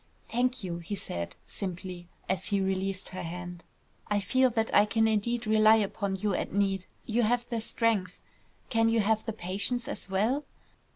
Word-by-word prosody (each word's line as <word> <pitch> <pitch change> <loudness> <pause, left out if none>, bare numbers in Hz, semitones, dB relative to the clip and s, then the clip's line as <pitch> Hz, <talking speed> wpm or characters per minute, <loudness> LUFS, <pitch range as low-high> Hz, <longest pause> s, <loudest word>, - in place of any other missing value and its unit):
"Thank 250 0 0
you," 170 -2 -3
he 170 +4 -4
said, 85 - -4
simply, 180 -2 -6 0.2
as 190 - 0
he 200 -2 +2
released 190 0 -1
her 185 - -6
hands. 175 +1 -6 0.5
"I 205 0 +2
feel 260 +5 +3
that 225 -1 -1
I 205 - +7
can 225 +1 +2
indeed 230 +2 0
rely 215 0 +6
upon 200 -2 0
you 205 +1 0
at - - -2
need. 195 -1 0 0.2
You 230 +2 +1
have 240 +2 +1
the 230 -1 0
strength; 225 -4 0 0.5
can 225 -1 +4
you 225 -1 +3
have 220 +1 +2
the 225 - -1
patience 205 +5 -1
as - - -6
well? 220 +10 +1
205 Hz, 175 wpm, -29 LUFS, 190-225 Hz, 0.5 s, I